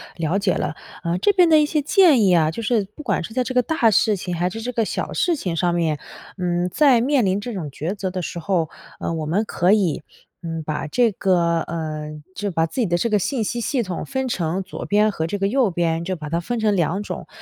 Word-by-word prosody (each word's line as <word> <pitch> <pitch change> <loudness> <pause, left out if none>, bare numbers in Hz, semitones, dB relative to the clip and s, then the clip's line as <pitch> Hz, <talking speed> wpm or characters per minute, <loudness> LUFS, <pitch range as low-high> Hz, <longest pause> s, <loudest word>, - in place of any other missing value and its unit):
了 165 +3 0
解 200 -2 +1
了。 150 - -2 0.3
呃， 170 +1 0
这 305 - +3
边 360 -3 +5
的 310 -1 +6
一 300 - +4
些 300 0 0
建 310 - +5
议 190 -2 +4
啊， 160 -2 +3
就 230 - -5
是 220 -2 +1
不 300 - -9
管 - - 0
是 220 - -8
在 255 +1 +1
这 255 - -4
个 250 - +4
大 245 -4 +2
事 210 +1 +3
情， 180 -1 -5
还 175 +2 0
是 225 +4 -6
这 250 +2 -3
个 230 -2 0
小 - - -3
事 350 -3 +1
情 180 - -3
上 175 0 +1
面， 160 -4 0 0.4
嗯， 175 0 0
在 265 - +4
面 265 -2 +2
临 190 +1 +1
这 240 +2 -5
种 170 -7 -4
抉 155 +7 -4
择 190 -2 -3
的 185 0 -3
时 170 - -5
候， 165 -2 0 0.3
呃， - - -2
我 160 -2 -3
们 185 +8 +1
可 180 -2 +1
以， 190 -8 +1 0.4
嗯， 165 -2 -4
把 150 0 -3
这 235 +7 +2
个 175 -4 +1
呃， 155 -2 -4 0.2
就 205 0 -2
把 165 -1 +1
自 165 - -6
己 - - +2
的 175 - +1
这 230 +7 0
个 210 - +3
信 235 +4 -1
息 240 +3 -2
系 255 +1 0
统 185 -4 -4
分 265 -1 -2
成 175 -4 -1
左 190 - -7
边 210 +1 +3
和 160 -5 -2
这 205 - -2
个 195 - +1
右 245 +1 +2
边， 165 -1 0
就 185 +2 -2
把 155 -2 -7
它 165 +2 0
分 230 +7 -3
成 215 -2 +2
2 180 +2 0
种。 - - -6
190 Hz, 270 characters per minute, -22 LUFS, 170-235 Hz, 0.4 s, 的